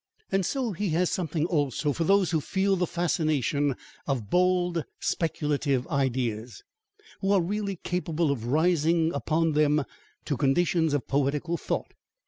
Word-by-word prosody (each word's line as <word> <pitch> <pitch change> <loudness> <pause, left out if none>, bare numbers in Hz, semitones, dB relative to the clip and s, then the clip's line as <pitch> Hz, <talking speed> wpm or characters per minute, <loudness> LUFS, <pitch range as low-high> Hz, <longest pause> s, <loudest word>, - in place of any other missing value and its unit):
And 195 0 +2
so 255 +3 -1
he 200 +1 -2
has 180 0 +2
something, 160 -3 -1
also, 145 -3 0
for 165 - -1
those 195 -2 +3
who 160 -3 +1
feel 195 +4 +1
the 180 -1 0
fascination 150 -5 0 0.3
of 120 -7 -2
bold 180 -2 +2 0.2
speculative 145 -5 0
ideas, 120 -5 -1 0.6
who 195 0 0
are 200 - +5
really 200 +3 -2
capable 170 -3 -1
of 120 -5 -3
rising 165 +3 +2
upon 165 -1 +1
them 150 -1 +2 0.4
to 145 - -1
conditions 160 +3 +2
of 145 - -2
poetical 145 +5 0
thought. - - -3
160 Hz, 140 wpm, -27 LUFS, 140-180 Hz, 0.6 s, are